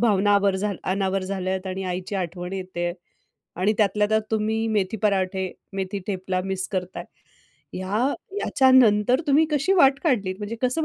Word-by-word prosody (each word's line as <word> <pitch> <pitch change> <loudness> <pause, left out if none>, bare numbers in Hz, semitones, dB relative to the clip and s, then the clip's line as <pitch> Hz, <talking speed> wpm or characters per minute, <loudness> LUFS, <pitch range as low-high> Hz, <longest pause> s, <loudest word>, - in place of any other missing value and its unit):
भावना 205 -3 +3
आवर 200 -1 +3 0.3
अनावर 190 0 0
झाल्यात 190 0 -3
आणि 190 0 -4
आईची 185 +3 -5
आठवण 180 0 -4
येते 180 -2 -3 0.6
आणि 190 +4 +2
त्यातल्या 210 0 +2
त्यात 220 0 +2
तुम्ही 220 +1 0
मेथी 210 -1 0
पराठे, 190 -2 0 0.2
मेथी 195 +1 -3
टेपला 185 -2 -2
मिस 190 -1 -2
करताय. 180 -2 -4 0.7
ह्या 210 +9 0 0.3
याच्यानंतर 255 -3 +4
तुम्ही 295 +2 +4
कशी 300 +5 +1
वाट 275 -6 +5
काढलीत 205 - +1
म्हणजे 210 +2 -5
कसं 255 +6 +1
195 Hz, 145 wpm, -24 LUFS, 185-220 Hz, 0.7 s, वाट